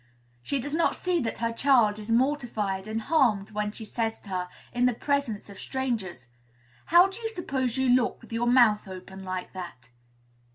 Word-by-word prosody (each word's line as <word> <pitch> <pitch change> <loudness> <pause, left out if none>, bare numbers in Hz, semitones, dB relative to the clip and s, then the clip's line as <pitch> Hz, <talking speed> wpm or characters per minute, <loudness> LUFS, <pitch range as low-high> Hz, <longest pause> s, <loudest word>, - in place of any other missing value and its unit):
She 275 - -2
does 285 +4 -5
not 330 +1 +2
see 360 -1 0
that 230 - -3
her 230 0 -1
child 230 -5 +3
is 215 +1 -8
mortified 230 -6 0
and 220 +1 -3
harmed 230 -11 +2
when 210 0 -2
she 220 +1 -8
says 225 +1 -2
to 200 - -14
her, 180 -1 -2 0.2
in 245 0 +3
the 250 - +1
presence 280 -6 -1
of 200 -1 -11
strangers, 220 - -3 0.6
"How 345 +3 +7
do 390 +4 -9
you 450 -1 -2
suppose 265 - -2
you 265 0 +2
look 250 -1 +3
with 230 -1 -13
your 235 +1 0
mouth 235 -5 +5
open 190 +1 -9
like 185 -1 -5
that?" 170 -10 -9
230 Hz, 190 wpm, -27 LUFS, 205-265 Hz, 0.6 s, How